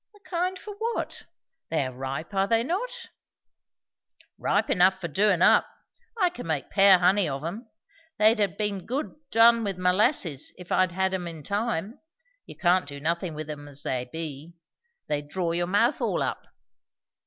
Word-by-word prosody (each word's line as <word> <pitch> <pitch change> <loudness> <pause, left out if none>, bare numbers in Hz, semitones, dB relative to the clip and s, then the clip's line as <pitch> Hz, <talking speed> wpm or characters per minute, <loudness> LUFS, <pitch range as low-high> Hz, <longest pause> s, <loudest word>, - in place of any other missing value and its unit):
"The - - -19
kind 365 0 -2
for 420 - -9
what? 460 +1 -3 0.4
They 155 -4 0
are 130 - -4
ripe, 135 +8 -5
are 195 0 +1
they 230 +2 +2
not?" 475 - -4 1.3
"Ripe - - +1
enough 190 +1 +4
for 175 - -4
doin' 185 +3 +2
up. - - +5 0.5
I 365 -3 +3
can 245 - -8
make 155 -4 -2
pear 195 -1 +7
honey 185 0 +3
of 135 +1 -4
'em. 220 +7 -6 0.5
They'd 215 +1 +4
ha' 200 -5 0
been 205 -3 -2
good 270 +6 -3 0.2
done 230 0 +5
with 195 -3 -2
molasses, 180 - +1
if 180 -1 -12
I'd 185 -2 +2
ha' - - -13
had 190 0 +1
'em 180 -2 -2
in 165 -3 -8
time. 205 - -2 0.5
You - - -10
can't 180 -2 +2
do 140 0 -7
nothin' 170 +2 -2
with 155 0 -6
'em 145 -1 -7
as 145 0 -9
they 125 -1 -2
be. 160 0 -7 0.5
They'd 145 0 -3
draw 175 0 -1
your 175 +1 -1
mouth 200 +3 +2
all - - 0
up." - - -4
185 Hz, 175 wpm, -26 LUFS, 160-215 Hz, 1.3 s, pear